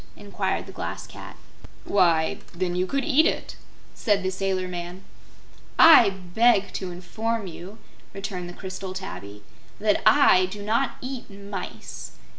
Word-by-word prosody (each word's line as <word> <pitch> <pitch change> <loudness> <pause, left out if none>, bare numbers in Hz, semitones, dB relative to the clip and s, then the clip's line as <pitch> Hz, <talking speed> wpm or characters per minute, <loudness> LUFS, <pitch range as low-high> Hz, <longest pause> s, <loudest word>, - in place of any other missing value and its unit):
inquired - - -3
the - - -10
Glass - - -5
Cat. - - -11 0.5
"Why, 170 -5 +2 0.2
then 175 0 -2
you 180 +1 0
could 275 +4 -1
eat 315 0 +4
it," - - -3 0.4
said 205 -4 +1
the 185 - 0
sailor 190 -1 -1
man. 175 +1 -7 0.7
"I 280 -10 +9
beg 195 +3 +2
to 190 - -4
inform 220 +5 -3
you," 185 +4 -9 0.3
returned 195 -3 -5
the - - -9
crystal 185 0 -7
tabby, 105 - -8 0.4
"that 210 -1 +2
I 185 -10 +6
do 205 +2 -8
not 230 +6 0
eat 255 -1 -6
mice. 200 -1 -8
190 Hz, 140 wpm, -25 LUFS, 180-215 Hz, 0.7 s, I